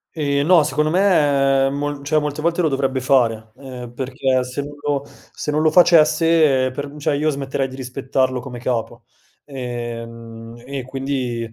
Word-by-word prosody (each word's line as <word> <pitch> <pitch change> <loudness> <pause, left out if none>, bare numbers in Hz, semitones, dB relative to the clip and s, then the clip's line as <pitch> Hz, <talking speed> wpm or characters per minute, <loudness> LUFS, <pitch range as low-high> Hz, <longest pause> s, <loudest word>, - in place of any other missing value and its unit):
Ehm, 140 -2 0
no 175 -3 +6
secondo 150 +1 0
me, 145 -7 +3
mol 145 0 -4
cioè 155 +2 +2
molte 150 0 -4
volte 170 +2 0
lo - - +3
dovrebbe 135 -1 -1
fare, 115 -4 +1
ehm, 125 -3 -9
perché 130 0 -1
se 125 +3 -5
non 145 +1 -9
lo 145 -1 -1
se 150 - -8
non 150 +1 +1
lo 155 - +4
facesse 160 -5 +4
per 145 +3 -5
m 145 - -12
cioè 145 0 0
io 150 +2 +1
smetterei 135 -2 -2
di 130 - -10
rispettarlo 130 0 -1
come 125 -1 -8
capo. 120 -1 -3 0.4
Ehm, 115 -3 -7
e 135 0 -5
quindi 130 -3 -3
135 Hz, 165 wpm, -20 LUFS, 125-145 Hz, 0.4 s, no